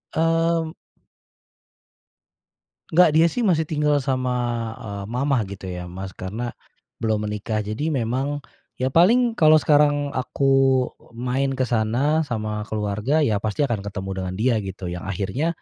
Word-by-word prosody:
Mmm. 165 0 +1 2.2
Enggak, 175 0 +6
dia 165 +2 +5
sih 245 +5 -2
masih 160 -5 +2
tinggal 150 -2 +2
sama, 130 -2 -1 0.5
eee, 100 -2 -6
mama 135 +2 +1
gitu 95 -1 -8
ya, 90 0 -5
Mas, 95 +2 -7
karena 110 +6 -4 0.5
belum 110 -2 -1
menikah. 105 +1 -2
Jadi 120 +10 -2
memang 135 +4 -1 0.4
ya 130 - +2
paling 230 - +4
kalau 155 -1 +6
sekarang 145 -1 +3
aku 135 0 +2 0.2
main 130 +3 -1
ke 130 0 0
sana 125 +8 +1
sama 110 -3 -3
keluarga, 110 +8 0
ya 110 -8 +2
pasti 105 +5 -2
akan 115 -8 0
ketemu 95 -1 -5
dengan 90 0 -4
dia, 120 0 +3
gitu. 95 -2 -6
Yang 85 0 -5
akhirnya 100 - -2
130 Hz, 140 wpm, -23 LUFS, 105-150 Hz, 2.2 s, Enggak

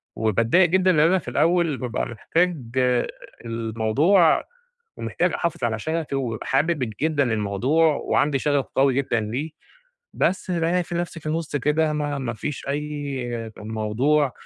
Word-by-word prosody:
وباتضايق 115 - +3
جدًا 185 +1 +3
لإن 155 - +2
أنا 185 +2 +3
في - - -15
الأول 170 -4 +2
بابقى 125 -2 -2
محتاج 165 - 0 0.9
الموضوع 115 - +2 0.5
ومحتاج - - -1
أحافظ 170 -6 -2
على 115 -2 0
شغفي 160 +2 -2
وبابقي 120 -5 -3
حابب 135 -5 +1
جدًا 155 -2 +2
الموضوع 125 +10 +2
وعندي 140 -1 +1
شغف 145 -1 +1
قوي 135 0 +4
جدًا 130 -4 +1
ليه، 120 +9 -3 0.7
بس 185 0 0
بالاقي 175 +1 +1
ف 175 - -11
نفسي 170 -1 -3
في 155 - -13
النُص 155 -1 -2
كده 150 +3 +1
ما 145 -1 -2
ما 120 -3 -3
فيش 135 +5 -5
أي 140 -5 -3
موضوع 110 +7 0
145 Hz, 140 wpm, -23 LUFS, 120-165 Hz, 0.9 s, قوي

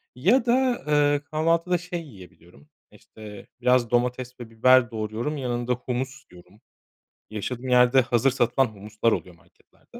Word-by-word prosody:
ya 215 - +2
da, 250 0 +1
ııı, 145 -1 +2
kahvaltıda 165 +3 0
şey 175 0 -6
yiyebiliyorum 90 - -17 0.2
işte 105 -2 -13
biraz 125 -2 +2
domates 125 +1 -1
ve 120 - -9
biber 120 +2 +4
doğruyorum 110 +7 -4
yanında 120 -1 -2
humus 130 +2 -5
yiyorum. 90 +4 -18 0.7
Yaşadığım 120 +4 -5
yerde 125 +1 +5
hazır 120 +2 +1
satılan 125 +1 +1
humuslar 110 +1 -2
oluyor 90 -4 -4
marketlerde. 85 0 -30
125 Hz, 130 wpm, -24 LUFS, 110-145 Hz, 0.7 s, yerde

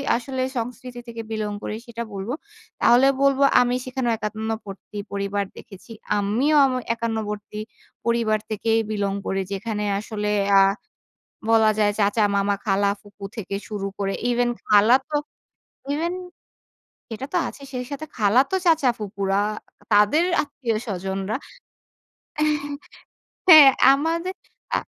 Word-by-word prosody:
আসলে 255 +2 -3 0.2
সংস্কৃতি 245 +1 -5
থেকে 230 -1 -6
বিলং 215 -1 -2
করি - - -3
সেটা 235 0 -5
বলব। 195 +2 -5 0.5
তাহলে 245 +3 +6
বলব 275 -1 +3 0.2
আমি 245 0 +1
সেখানেও 255 -2 -1
একান্নবর্তী 215 -2 -5
পরিবার 200 0 -1
দেখেছি। 200 +2 -13 0.3
আমিও 230 +10 +1
আম 265 - 0 0.2
একান্নবর্তী 215 -2 -4 0.5
পরিবার 230 -2 +1
থেকেই 225 +1 +1
বিলং 200 -2 -1
করি। 195 0 -1
যেখানে 210 +1 -3 0.2
আসলে 210 -1 -3 0.3
আ - - +7 0.9
বলা 220 -1 +5
যায় 205 -1 +3
চাচা, 205 +2 +2
মামা, 200 0 +2
খালা 200 0 +2
ফুকু 205 -1 -13
থেকে 200 -3 -5
শুরু 205 -2 -4
করে 195 -1 -1 0.2
ইভেন 245 0 +2 0.2
খালা 210 +3 +6
তো 300 - -1 0.8
ইভেন 335 +4 -1 1.0
সেটা 230 +3 -5
তো - - +3
আছেই। 275 - -10
সেই 250 -1 -3
সাথে 285 +2 -5
খালাতো 240 - +3
চাচা 320 -6 +4
ফুপুরা, 200 -2 -1 0.5
তাদের 210 +10 +5 0.2
আত্মীয় 250 -6 -3
স্বজনরা 195 +1 -3 1.1
এহ 300 -1 +1 0.9
হ্যাঁ, 310 -6 +11 0.2
আমাদের 330 +6 -1 0.4
আ - - +2
220 Hz, 125 wpm, -23 LUFS, 205-255 Hz, 1.1 s, হ্যাঁ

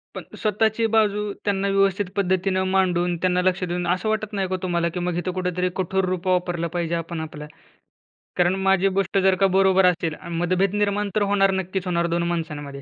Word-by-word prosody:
पण - - -6
स्वतःची 220 +2 +1
बाजू 210 -1 +2
त्यांना 200 -1 0
व्यवस्थित 195 0 +2
पद्धतीनं 190 -1 +1
मांडून 180 -2 +1
त्यांना 180 +1 +1
लक्ष 185 0 0
देऊन, 175 0 -2
असं 185 +5 0
वाटत 215 0 -2
नाही 195 -2 -1
का 185 - -2
तुम्हाला, 170 -2 0
की 180 +2 -5
मग 175 -1 -2
इथं 180 +1 -2
कुठेतरी 180 0 -1
कठोर 190 +1 0
रूप 185 0 -3
वापरलं 175 -2 0
पाहिजे 170 -1 -1
आपण 165 0 -4
आपलं? 150 -1 -7 0.9
कारण 180 +1 +3
माझी 195 0 +3
गोष्ट 195 0 0
जर 190 -1 +4
का 195 +1 +3
बरोबर 190 -1 +4
असेल 170 -3 +1
आ, - - -10
मतभेद 180 +3 0
निर्माण 205 0 0
तर 215 - +2
होणार 195 -1 +3
नक्कीच 185 +1 -4
होणार 170 -1 +1
2 170 0 0
माणसांमध्ये. 145 -4 -5
185 Hz, 190 wpm, -23 LUFS, 175-195 Hz, 0.9 s, जर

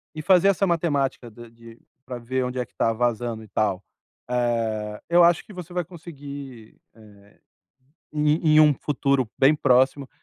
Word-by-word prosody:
E 155 - -6
fazer 185 +1 +4
essa 195 0 +2
matemática 145 -8 -1
da 120 +2 -13
de 115 0 -16 0.2
pra 125 -2 -7
ver 130 +2 -2
onde 125 +1 -5
é 125 - -1
que - - -35
tá 115 - +1
vazando 120 -1 -2
e - - -14
tal. 100 -2 -1 0.5
Eh, 115 -4 -2
eu 175 0 +5
acho 170 0 +3
que 210 - -13
você 180 -1 -9
vai 180 -1 -1
conseguir, 140 -8 -10 0.2
eh, 110 - -18 1.1
em 155 +1 +2
em - - +8
um 150 -2 +5
futuro 135 -3 -1
bem 135 +3 +5
próximo, 130 -1 +2
130 Hz, 170 wpm, -24 LUFS, 115-155 Hz, 1.1 s, em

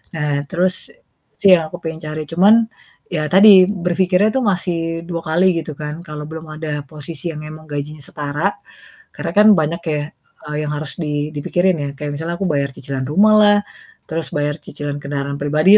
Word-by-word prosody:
Nah 150 -2 -1 0.2
terus 180 +3 +1 0.7
sih 200 - +6
yang 165 - +5
aku 175 - -8
pengen 160 -1 -4
cari, 155 0 -4
cuman 190 +6 +6 0.6
ya 155 -3 -1
tadi 200 +3 +8 0.2
berpikirnya 185 +1 +2
tuh - - +3
masih 180 -1 -1 0.3
2 170 -1 -3
kali 165 +4 +2
gitu 155 -1 -6
kan 150 +2 -6
kalau 150 0 -6
belum 160 0 -7
ada 155 0 -5 0.2
posisi 150 +1 -8
yang 150 - -6
memang 155 +1 -9
gajinya 150 +1 -5
setara, 150 +7 -2 0.6
karena 170 - -4
kan 210 +1 +7
banyak 160 +2 -1
ya, 150 - -1 0.5
eee, 150 - -3
yang - - -2
harus 150 -1 -5
di 150 0 -2
dipikirin 175 +5 +1
ya, 140 - -3
kayak 150 0 -4
misalnya 165 +3 -3
aku - - -1
bayar 140 -2 0
cicilan 135 0 -4
rumah 200 +9 +5
lah, 205 -1 +6 0.5
terus 160 -3 -3
bayar 145 0 0
cicilan 145 -1 -6
kendaraan 140 0 -3
pribadi 155 +8 +5
155 Hz, 180 wpm, -19 LUFS, 150-180 Hz, 0.7 s, tadi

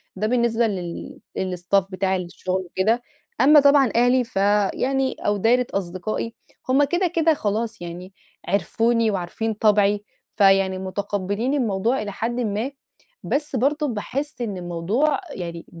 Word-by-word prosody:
ده 210 +3 -1
بالنسبة 235 -1 +2
لل 180 -5 -5 0.2
للstaff 185 +1 0
بتاعي 190 0 0
للشغل 185 +2 -3
وكده. 210 +7 +1 0.4
أمّا 295 +3 +8
طبعًا 280 -3 +5
أهلي، 245 +2 +4
ف 230 - -17 0.4
يعني 270 0 0
أو 205 0 0
دايرة 240 +4 +3
أصدقائي 195 +4 -3 0.4
هُم 270 +3 +4
كده 350 +6 +1
كده 330 -1 +2
خلاص 220 -4 -2
يعني 175 +2 -8 0.3
عِرفوني 225 +4 +1
وعارفين 200 +4 -2
طبعي، 205 -1 +3 0.3
فيعني 195 -2 +4
متقبلين 200 +5 -2
الموضوع 230 -2 0
إلى 205 -1 -4
حدٍ 235 +5 -3
ما، 225 +3 -1 0.5
بس 290 -1 -2
برضه 290 +5 +1
باحس 255 +4 -4
إن 210 -5 -3
الموضوع 180 - 0
يعني 170 -5 -6
215 Hz, 135 wpm, -23 LUFS, 190-250 Hz, 0.5 s, أمّا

